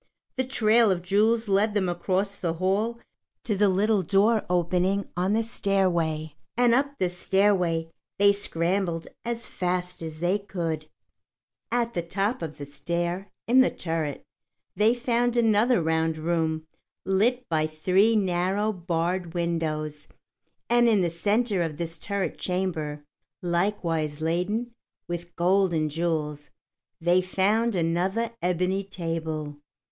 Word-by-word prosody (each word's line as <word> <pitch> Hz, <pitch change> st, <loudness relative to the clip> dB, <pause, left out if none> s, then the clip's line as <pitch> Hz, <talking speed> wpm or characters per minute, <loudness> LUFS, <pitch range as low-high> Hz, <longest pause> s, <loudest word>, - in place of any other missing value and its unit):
The 260 Hz, -, 0 dB
trail 230 Hz, -3 st, +4 dB
of 180 Hz, -2 st, 0 dB
jewels 220 Hz, +4 st, +2 dB
led 205 Hz, +2 st, +2 dB
them 195 Hz, -3 st, +2 dB
across 190 Hz, +3 st, -1 dB
the 170 Hz, -4 st, -2 dB
hall 195 Hz, +7 st, 0 dB, 0.5 s
to 220 Hz, -5 st, 0 dB
the 205 Hz, +1 st, +3 dB
little 200 Hz, +2 st, +2 dB
door 205 Hz, +5 st, +3 dB
opening 180 Hz, +3 st, +1 dB
on 185 Hz, +3 st, +1 dB
the 225 Hz, +1 st, +2 dB
stairway, 170 Hz, -8 st, 0 dB, 0.2 s
and 245 Hz, -1 st, +4 dB
up 280 Hz, +3 st, +1 dB
this 180 Hz, -1 st, -1 dB
stairway 180 Hz, -4 st, +1 dB, 0.3 s
they 200 Hz, 0 st, +6 dB
scrambled 175 Hz, -3 st, -1 dB, 0.2 s
as 235 Hz, 0 st, -3 dB
fast 180 Hz, -1 st, -3 dB
as 160 Hz, -1 st, -6 dB
they 180 Hz, +4 st, +1 dB
could 170 Hz, -6 st, -3 dB
go. 155 Hz, -, -22 dB, 0.8 s
At 235 Hz, -1 st, 0 dB
the 175 Hz, -, -1 dB
top 195 Hz, +7 st, -1 dB
of 155 Hz, -2 st, -5 dB
the 145 Hz, -, -6 dB
stair, 170 Hz, +6 st, -3 dB, 0.2 s
in 255 Hz, +3 st, +6 dB
the 260 Hz, -, +4 dB
turret, 160 Hz, -4 st, -3 dB, 0.5 s
they 220 Hz, +3 st, +4 dB
found 240 Hz, 0 st, 0 dB
another 225 Hz, -2 st, +3 dB
round 160 Hz, 0 st, +1 dB
room 160 Hz, -1 st, -1 dB, 0.4 s
lit 235 Hz, +6 st, +1 dB
by 155 Hz, -1 st, +1 dB
three 185 Hz, +8 st, +3 dB
narrow, 195 Hz, +2 st, +1 dB
barred 175 Hz, 0 st, -2 dB
windows, 155 Hz, -3 st, -2 dB, 0.6 s
and 240 Hz, 0 st, +4 dB
in 210 Hz, -4 st, +4 dB
the 170 Hz, -2 st, +1 dB
centre 205 Hz, +4 st, +1 dB
of 160 Hz, -3 st, -2 dB
this 165 Hz, 0 st, -4 dB
turret 200 Hz, -1 st, -3 dB
chamber, 160 Hz, -6 st, -2 dB, 0.4 s
likewise 170 Hz, -4 st, -1 dB
laden 180 Hz, +9 st, -1 dB, 0.3 s
with 175 Hz, 0 st, -6 dB
gold 185 Hz, +1 st, +2 dB
and 155 Hz, -1 st, 0 dB
jewels, 150 Hz, -3 st, -2 dB, 0.5 s
they 175 Hz, +2 st, +3 dB
found 205 Hz, +5 st, +1 dB
another 185 Hz, +7 st, 0 dB
ebony 180 Hz, +2 st, 0 dB
table. 160 Hz, -5 st, -4 dB
185 Hz, 135 wpm, -26 LUFS, 165-210 Hz, 0.8 s, they